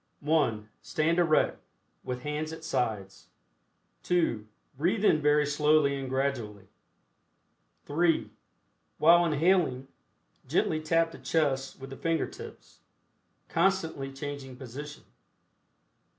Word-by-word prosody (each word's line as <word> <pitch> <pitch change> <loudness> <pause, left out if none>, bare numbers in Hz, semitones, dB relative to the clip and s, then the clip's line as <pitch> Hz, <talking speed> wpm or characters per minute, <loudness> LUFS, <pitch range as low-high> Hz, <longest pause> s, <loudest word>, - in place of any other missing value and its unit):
(1) 140 -9 +1
Stand 165 +3 0
erect, 165 -3 +2 0.4
with 125 0 -5
hands 150 +1 -3
at 160 0 -9
sides. 105 -9 -3 0.7
(2) 140 -12 0 0.3
Breathe 185 - 0
in 155 - +4
very 150 0 +3
slowly 150 -1 +3
and 135 -1 -5
gradually. 125 -7 -2 1.2
(3) 165 +2 +1 0.7
While 170 +2 +6
inhaling, 150 -5 +2 0.6
gently 155 - +1
tap 165 +1 +1
the - - -11
chest 135 -5 -1
with 135 0 -9
the 135 - -8
finger 165 -1 0
tips, 440 +4 -12 0.7
constantly 165 -6 0
changing 135 -1 -7
position. 140 +4 -9
150 Hz, 105 wpm, -29 LUFS, 135-165 Hz, 1.2 s, While